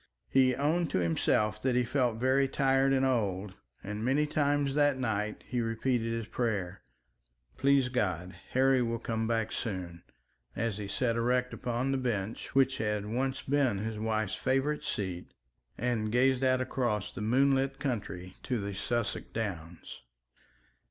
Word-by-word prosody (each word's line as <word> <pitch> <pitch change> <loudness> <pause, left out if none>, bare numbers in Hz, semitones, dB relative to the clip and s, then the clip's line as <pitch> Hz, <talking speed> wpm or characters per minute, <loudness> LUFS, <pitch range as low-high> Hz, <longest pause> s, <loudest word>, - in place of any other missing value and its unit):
He 130 -1 +4
owned 160 +4 +1
to - - 0
himself 105 +5 +1
that 130 0 +1
he 125 - +3
felt 120 -2 0
very 130 +3 +3
tired 135 0 +2
and 135 0 +3
old, 105 -6 0 0.3
and 105 +2 -4
many 135 +5 +2
times 145 -2 +1
that 145 -1 +3
night 105 -4 -2
he 125 -1 -1
repeated 115 +1 0
his 115 -1 -2
prayer, 105 -6 -2 0.7
"Please 140 - +3
God, 95 -8 -1 0.2
Harry 130 0 +4
will 115 -1 0
come 115 -1 -2
back 115 -1 0
soon," 90 -6 -4 0.5
as 110 -1 -2
he 100 - -4
sat 115 +3 0
erect 125 +2 +1
upon 125 +2 -1
the 135 - 0
bench 115 -3 -3
which 135 0 +3
had 105 -2 -1
once 130 +5 -2
been 135 -6 +2
his 110 +1 -4
wife's 110 -2 -1
favourite 135 +3 0
seat, 95 -4 -4 0.4
and 115 -3 -1
gazed 130 +2 +3
out 130 -1 +3
across 120 -6 -1
the - - -7
moonlit 135 +4 +2
country 95 -8 -4
to 125 -3 -2
the 100 0 -4
Sussex 115 +3 -2
Downs. 90 -7 -5
120 Hz, 150 wpm, -30 LUFS, 105-135 Hz, 0.7 s, He